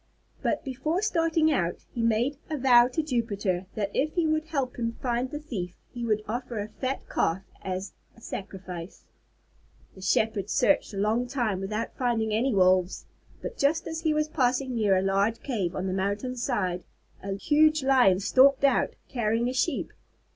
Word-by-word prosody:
But - - 0
before 305 +8 -1
starting 330 -5 +2
out 175 - -1
he 235 - -2
made 230 +5 +1
a 310 - -2
vow 245 -2 +6
to 285 +5 -2
Jupiter 205 - -1
that 200 -2 -2
if 305 +3 0
he 345 -2 +2
would 310 0 +1
help 275 -6 -2
him 230 -1 -1
find 245 0 -1
the 295 - -5
thief 205 - -5 0.2
he 240 - -5
would 215 -2 0
offer 240 +1 -4
a 205 0 -3
fat 265 +4 -4
Calf 180 +4 0 0.2
as 190 +1 -4 0.2
a - - -15
sacrifice. 185 -4 -7 0.9
The 190 - -14
Shepherd 205 +1 +1
searched 250 -4 +2
a - - -5
long 220 +5 +1
time 240 -7 -1
without 210 +4 -3
finding 225 -4 0
any 245 +5 +2
Wolves, 185 -2 +3 0.4
but - - -6
just 310 +4 +2
as 320 0 -4
he 320 -2 +1
was 305 0 +1
passing 260 -3 0
near 210 -5 +3
a 185 - +1
large 200 +4 +1
cave 200 -10 -2
on 185 - -2
the 185 - -1
mountain 200 +7 -2
side, 205 -8 -1 0.4
a 195 0 -3
huge 305 +6 +3
Lion 250 -9 +5
stalked 265 +7 +4
out, 275 - +3
carrying 235 -1 0
a - - -3
Sheep. 290 +6 -1
235 Hz, 175 wpm, -27 LUFS, 195-275 Hz, 0.9 s, vow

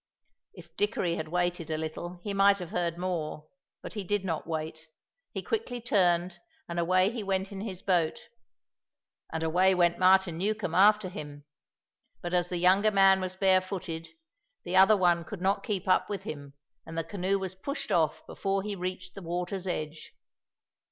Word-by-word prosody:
If 170 -3 -14
Dickory 195 -4 0
had 160 - -4
waited 175 -1 -1
a 155 - -1
little 175 +3 -6
he 205 - -3
might 200 0 +5
have 180 -3 -7
heard 170 -1 -1
more, 170 -4 -3 0.4
but - - -7
he 210 -3 -4
did 200 +1 -1
not 165 -4 -3
wait; 160 -1 -4 0.4
he - - -5
quickly 430 - -2
turned, 180 -6 +1 0.3
and 170 - -3
away 185 +3 +3
he 235 -1 -4
went 195 -1 -1
in 195 -1 -6
his 195 -4 -6
boat. 175 -5 +1 1.1
And 160 0 -3
away 185 +4 +3
went 175 -1 +2
Martin 185 -2 +4
Newcombe 205 -3 -1
after 210 +2 +5
him. 145 -5 -9 0.7
But 175 0 -5
as 175 0 +1
the 180 - -2
younger 190 +4 +4
man 195 -2 +5
was 185 0 -3
barefooted, 185 -3 0 0.6
the - - -3
other 195 +3 +7
one 175 -2 +3
could 190 +4 -8
not 190 +2 +1
keep 200 -4 -3
up 185 - +3
with 200 -2 -4
him, 145 -7 -8 0.3
and 160 +1 -9
the 165 - 0
canoe 195 +3 -1
was 190 -1 -4
pushed 280 +10 -5
off 160 -3 +1
before 195 0 -2
he 210 0 -3
reached 185 0 -5
the 195 - -9
water's 180 +2 -3
edge. 155 -3 -4
185 Hz, 175 wpm, -29 LUFS, 170-195 Hz, 1.1 s, other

